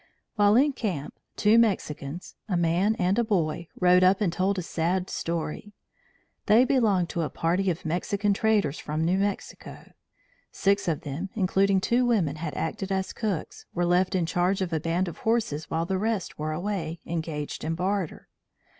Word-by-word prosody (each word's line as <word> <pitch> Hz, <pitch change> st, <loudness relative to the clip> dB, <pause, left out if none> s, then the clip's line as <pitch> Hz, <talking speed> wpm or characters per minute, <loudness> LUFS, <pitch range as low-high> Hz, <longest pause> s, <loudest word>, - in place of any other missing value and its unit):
While 205 Hz, -1 st, +4 dB
in 280 Hz, +4 st, +4 dB
camp 180 Hz, -, -3 dB, 0.2 s
two 215 Hz, +2 st, +4 dB
Mexicans, 175 Hz, -7 st, -1 dB, 0.2 s
a 180 Hz, -, +1 dB
man 175 Hz, +6 st, +2 dB
and 185 Hz, +3 st, +1 dB
a -, -, +3 dB
boy, 170 Hz, -6 st, -1 dB
rode 180 Hz, 0 st, +5 dB
up 185 Hz, +1 st, +5 dB
and 190 Hz, -6 st, 0 dB
told 195 Hz, +2 st, 0 dB
a 180 Hz, -, -2 dB
sad 180 Hz, +3 st, -1 dB
story. 170 Hz, +4 st, -4 dB, 0.7 s
They 230 Hz, +4 st, +6 dB
belonged 215 Hz, -10 st, +2 dB
to 170 Hz, -, -2 dB
a 155 Hz, -, -1 dB
party 180 Hz, +4 st, 0 dB
of 170 Hz, -2 st, -3 dB
Mexican 200 Hz, +5 st, 0 dB
traders 205 Hz, -8 st, +1 dB
from 155 Hz, +2 st, -2 dB
New 185 Hz, +3 st, +2 dB
Mexico. 200 Hz, 0 st, -4 dB, 0.6 s
Six 200 Hz, -1 st, +1 dB
of 160 Hz, -4 st, 0 dB
them, 150 Hz, +7 st, -5 dB
including 195 Hz, -1 st, +2 dB
two 240 Hz, +5 st, +2 dB
women 190 Hz, -, +1 dB
who 160 Hz, +1 st, -4 dB
acted 165 Hz, +5 st, -3 dB
as 190 Hz, 0 st, -1 dB
cooks, 205 Hz, -8 st, -4 dB
were 175 Hz, 0 st, +1 dB
left 180 Hz, +2 st, +2 dB
in 180 Hz, -3 st, +1 dB
charge 180 Hz, +3 st, +1 dB
of 185 Hz, -3 st, -2 dB
a 160 Hz, -, +1 dB
band 170 Hz, +4 st, 0 dB
of 170 Hz, -, -7 dB
horses 220 Hz, -10 st, -1 dB
while 165 Hz, +1 st, -1 dB
the 190 Hz, +1 st, -1 dB
rest 215 Hz, -6 st, -2 dB
were 155 Hz, +1 st, -2 dB
away, 170 Hz, -1 st, -3 dB
engaged 160 Hz, -3 st, -4 dB
in 160 Hz, +1 st, -1 dB
barter. 185 Hz, -1 st, -2 dB
185 Hz, 175 wpm, -26 LUFS, 165-200 Hz, 0.7 s, They